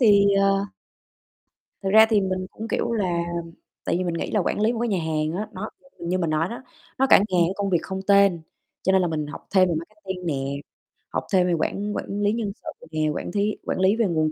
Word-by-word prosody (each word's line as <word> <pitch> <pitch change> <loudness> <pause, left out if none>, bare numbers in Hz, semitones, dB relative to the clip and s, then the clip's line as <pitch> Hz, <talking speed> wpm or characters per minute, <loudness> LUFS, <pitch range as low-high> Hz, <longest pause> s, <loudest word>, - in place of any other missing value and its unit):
thì, 205 -4 +6 0.2
ờ 195 0 +2 1.2
Thực 195 - -1
ra 220 +1 +8
thì 215 -2 +3
mình 185 -1 -2
cũng, 220 +1 -7
kiểu 235 - -1
là 180 -6 0 0.6
tại - - 0
vì 185 - -1
mình 175 -2 -1
nghĩ - - -3
là 210 - +2
quản 200 - -1
lý 220 +2 +3
một 230 - -3
cái 240 - 0
nhà 195 -4 +1
hàng 155 -1 -1
á, 215 - -3
nó, 215 +4 -5 0.3
ừm, 170 - -6
như 185 +1 +1
mình 170 -3 0
nói 155 +3 +1
đó, 235 - -7 0.4
nó 270 - +4
cả - - +9
ngàn 180 -2 +3
công 200 -1 -1
việc 175 - +3
không 190 0 -4
tên, 200 -3 +5 0.4
cho 190 - +2
nên 190 -1 +4
là 175 - +1
mình 155 -2 -2
học 150 - -9
thêm 185 -2 +5
về 170 - 0
marketing 190 +1 -6
nè, 155 - 0 0.8
học - - -2
thêm 180 -1 +4
về 175 - +1
quản 205 +5 -1
quản 205 +1 -3
lý 205 0 +3
nhân 225 -3 -2
sự - - -10
nè, 155 -1 0
quản - - -4
thí 205 +1 0
quản - - -2
lý 190 +3 +4
về 230 -2 +2
nguồn 155 -3 +1
190 Hz, 245 wpm, -24 LUFS, 170-205 Hz, 1.2 s, cả